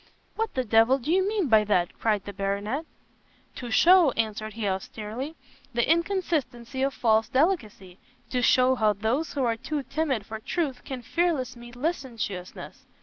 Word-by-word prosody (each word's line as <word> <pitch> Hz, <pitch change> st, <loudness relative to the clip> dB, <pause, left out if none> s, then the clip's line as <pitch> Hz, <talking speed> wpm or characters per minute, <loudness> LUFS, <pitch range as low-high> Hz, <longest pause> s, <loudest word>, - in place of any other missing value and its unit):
"What 450 Hz, -1 st, -2 dB
the 260 Hz, -, +1 dB
d 225 Hz, -1 st, 0 dB
l 235 Hz, +4 st, +6 dB
do 275 Hz, +4 st, -3 dB
you 380 Hz, +2 st, +3 dB
mean 415 Hz, -6 st, 0 dB
by 220 Hz, -3 st, +5 dB
that?" 180 Hz, -4 st, +1 dB
cried 210 Hz, -3 st, 0 dB
the 205 Hz, -, -7 dB
Baronet. 205 Hz, -, -2 dB, 0.7 s
"To 245 Hz, -, -6 dB
shew," 345 Hz, +7 st, +6 dB
answered 215 Hz, -1 st, -2 dB
he, 220 Hz, -2 st, -3 dB
austerely, 215 Hz, +9 st, -4 dB, 0.4 s
"the 235 Hz, -, +2 dB
inconsistency 305 Hz, -8 st, -1 dB
of 275 Hz, 0 st, 0 dB
false 220 Hz, -2 st, +2 dB
delicacy; 230 Hz, -, 0 dB, 0.3 s
to 250 Hz, -, 0 dB
show 255 Hz, +1 st, +4 dB
how 215 Hz, -4 st, +2 dB
those 225 Hz, +10 st, -1 dB
who 275 Hz, -, -1 dB
are 230 Hz, -2 st, +1 dB
too 290 Hz, +5 st, -4 dB
timid 270 Hz, -5 st, -1 dB
for 220 Hz, +1 st, -6 dB
truth, 275 Hz, +1 st, -3 dB
can 260 Hz, -3 st, -6 dB
fearless 290 Hz, -4 st, 0 dB
meet 240 Hz, 0 st, -12 dB
licentiousness." 245 Hz, -, -5 dB
245 Hz, 165 wpm, -26 LUFS, 220-300 Hz, 0.7 s, l